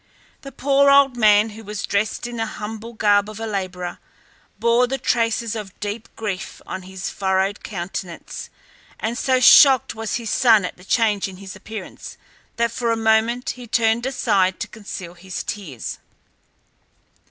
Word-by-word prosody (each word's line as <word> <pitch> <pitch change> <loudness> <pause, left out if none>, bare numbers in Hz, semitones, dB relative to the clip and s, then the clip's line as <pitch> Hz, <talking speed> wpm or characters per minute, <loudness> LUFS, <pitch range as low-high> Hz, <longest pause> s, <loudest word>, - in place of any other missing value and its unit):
The 275 - -9
poor 280 +2 +3
old 275 -2 +5
man, 215 -1 +4
who 220 +2 -11
was 210 -1 -5
dressed 205 +3 -1
in 240 0 -5
the 225 0 -1
humble 220 +2 -6
garb 205 -2 +3
of 215 0 -9
a 225 - -3
labourer, 185 -4 -4 0.6
bore 235 +3 +3
the 270 +2 -2
traces 230 -2 0
of 205 -4 -8
deep 210 +2 -5
grief 205 -4 -5
on 185 - -5
his 185 0 -6
furrowed 190 +1 0
countenance, 175 -2 -6 0.5
and 225 +2 -2
so 260 +1 +2
shocked 265 0 +7
was 225 -1 -3
his 230 -3 -3
son 225 -6 +5
at - - -5
the 180 - -17
change 210 -1 +1
in 190 -1 -10
his 195 0 -9
appearance 220 -3 -9 0.4
that 235 -1 +1
for 235 0 -1
a 230 - +1
moment 225 +2 +2
he 250 -1 -10
turned 230 +2 +1
aside 195 -8 +1
to - - -2
conceal 200 -5 -8
his 180 +1 -6
tears. 160 - -6
220 Hz, 165 wpm, -21 LUFS, 195-235 Hz, 0.6 s, shocked